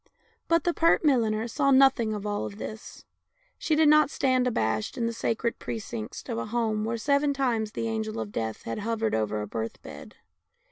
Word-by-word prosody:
But 335 0 +3
the 345 - +1
pert 330 0 +3
milliner 225 -5 +2
saw 275 +4 +1
nothing 265 -4 +5
of 205 0 -6
all 205 0 -2
this; 215 +2 -9 0.5
she 315 - +1
did 310 0 +4
not 305 -1 +6
stand 255 -3 +1
abashed 110 - -1
in 235 - 0
the 230 - -1
sacred 230 +1 -2
precincts 160 - -6
of 115 - -3
a 115 - -4
home 220 -2 -1
where 230 +1 -2
seven 280 +3 +1
times 230 -5 0
the 230 - -2
Angel 220 - -3
of 110 -2 -5
Death 110 0 -4
had 115 - -4
hovered 225 0 -1
over 105 -1 -1
a - - -6
birth 110 +2 -5
bed. - - -11
225 Hz, 190 wpm, -27 LUFS, 205-270 Hz, 0.5 s, not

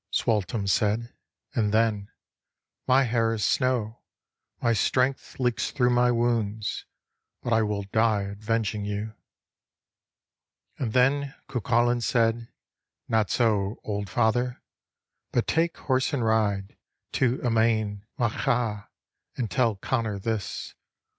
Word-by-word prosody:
Sualtem 105 -1 0
said, 105 +4 +1 0.4
and 105 -3 +1
then, 110 -2 +1 0.4
" - - -56
My 130 +2 +5
hair 115 -2 +1
is 110 -2 -2
snow, 120 -3 0 0.6
My 115 - +2
strength 130 +6 0
leaks 120 -4 0
thro' 125 -3 +2
my 120 0 +4
wounds, 115 -3 0 0.6
but 120 - 0
I 115 - +4
will 105 -2 -1
die 110 +1 +2
r 100 - -5
Avenging 105 0 -2
you." 105 +2 -3 1.7
And 115 -5 -2
then 135 +2 +2
Cuculain 120 0 +1
said: 115 0 +1 0.3
" - - -62
Not 110 -2 +2
so, 105 -3 +1
old 100 -1 -3
father, 120 +2 0 0.7
but 120 - +2
take 165 +1 +1
horse 130 +2 0
and 125 -5 0
ride 105 -3 0 0.4
To 130 -1 +3
Emain 110 -3 +1 0.2
Macha, 115 -3 0 0.5
and 115 -6 -2
tell 115 0 +2
Connor 110 0 -1
this." 105 -3 -3
115 Hz, 120 wpm, -26 LUFS, 105-120 Hz, 1.7 s, My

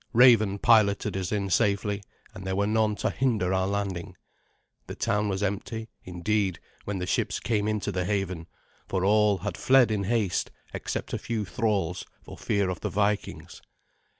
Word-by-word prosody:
Raven 115 -5 +6
piloted 105 -3 +3
us 95 -2 -3
in 100 -2 -1
safely, 100 -1 +1 0.3
and 95 - -9
there 95 0 -2
were 100 +1 +1
none 110 0 +1
to - - -1
hinder 110 -9 0
our 95 0 +1
landing. 100 -2 -3 0.7
The - - -6
town 105 +1 0
was 95 +1 -2
empty, 110 +3 -3
indeed, 95 +1 -1 0.3
when 100 -1 -3
the 90 - -3
ships - - -1
came 105 -3 0
into 110 -1 -1
the 90 - -1
haven, 95 -4 -2 0.4
for 95 0 -1
all 105 0 +4
had 100 -2 -5
fled 130 -3 +4
in 100 -2 -1
haste, 105 -4 0 0.2
except - - -4
a - - -1
few 110 -3 -3
thralls, 95 -5 -1 0.2
for - - -10
fear 100 -1 0
of 90 - -5
the - - -3
Vikings. 105 0 -2
100 Hz, 170 wpm, -27 LUFS, 95-110 Hz, 0.7 s, Raven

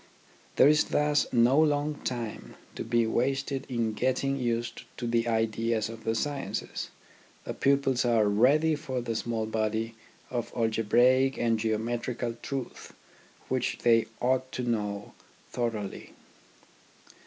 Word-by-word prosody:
There - - +7
is 150 0 +4
thus 150 0 +2
no 125 +4 +4
long 150 -1 +2
time 120 -3 -5 0.2
to - - -5
be 115 0 +2
wasted 135 +4 -1
in 115 -3 -1
getting 130 +4 0
used 120 -3 -2 0.2
to 120 - -4
the 115 0 +1
ideas 115 0 0
of 115 0 -10
the 115 - +1
sciences. 145 +4 -3 0.5
The - - -5
pupils 135 -2 +2
are 115 -3 +3
ready 140 +10 +4
for 140 -4 -3
the 115 -1 -3
small 115 -1 -2
body 110 +1 -1 0.4
of 120 -2 -3
algebraic 120 +4 +3
and 115 -1 +1
geometrical 115 +2 -2
truths 135 -3 -6 0.5
which 130 -1 -1
they 115 -2 +4
ought 130 +1 0
to 125 - -3
know 105 -4 -2 0.4
thoroughly. 110 -5 -4
120 Hz, 130 wpm, -28 LUFS, 115-130 Hz, 0.5 s, There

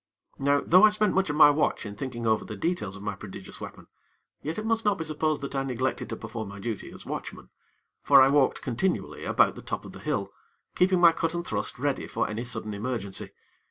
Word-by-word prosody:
Now, 140 +1 +3
though 185 +4 +6
I 215 - +9
spent 210 -1 +1
much 190 -3 +1
of 150 - -1
my 150 -1 +8
watch 145 -4 0
in 100 - -6
thinking 120 0 -5
over 110 -1 +2
the 105 - -7
details 105 - -2
of 100 - -10
my 105 - -2
prodigious 95 -1 -10
weapon, - - -9 0.6
yet 155 +3 -4
it 215 - -3
must 225 0 +1
not 205 -1 +2
be 160 - -3
supposed 155 -1 -1
that 140 - -5
I 135 - 0
neglected 130 -1 -2
to - - -3
perform 110 -1 -6
my 100 - -9
duty 110 0 -5
as - - -11
watchman; - - -7 0.5
for 140 -1 +7
I 135 0 +7
walked 140 -2 +2
continually 185 +11 -2
about - - +3
the - - -10
top - - -5
of - - -9
the - - -11
hill, - - -2 0.4
keeping 185 0 +3
my 170 -1 +8
cut 165 0 -2
and 170 0 -3
thrust - - -3
ready - - -1
for - - -1
any 110 +3 -4
sudden 115 -3 -4
emergency. 105 -2 -4
135 Hz, 230 wpm, -27 LUFS, 110-165 Hz, 0.6 s, I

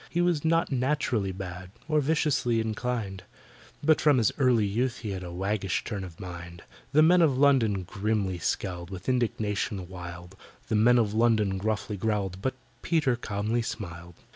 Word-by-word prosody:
He 170 - -2
was 175 -4 +2
not 165 0 +2
naturally 125 -6 0
bad, 90 -1 -7 0.2
Or 155 -1 +2
viciously 140 -5 +1
inclined, 110 -3 -3 0.6
But 155 +1 +4
from 150 -3 +5
his 115 -4 +3
early 125 -5 +4
youth 120 +5 -1
he 110 -3 -4
had 95 -1 -4
A 90 -1 -7
waggish 95 +1 -1
turn 100 -4 -4
of 85 -3 -10
mind. 85 -2 -8 0.3
The 155 +2 +5
Men 175 +2 +6
of 145 -6 +3
London 125 -9 +3
grimly 100 -1 -1
scowled 85 0 -2
With 95 -2 -8
indignation 105 -6 -1
wild; 90 0 -9 0.3
The - - +1
Men 120 +3 +5
of 110 -3 +2
London 110 -4 +2
gruffly 105 0 -2
growled, 100 -2 -1
But 130 +4 -1 0.3
PETER 155 -7 +2
calmly 110 +1 -1
smiled. 90 -6 -6
110 Hz, 165 wpm, -28 LUFS, 95-125 Hz, 0.6 s, Men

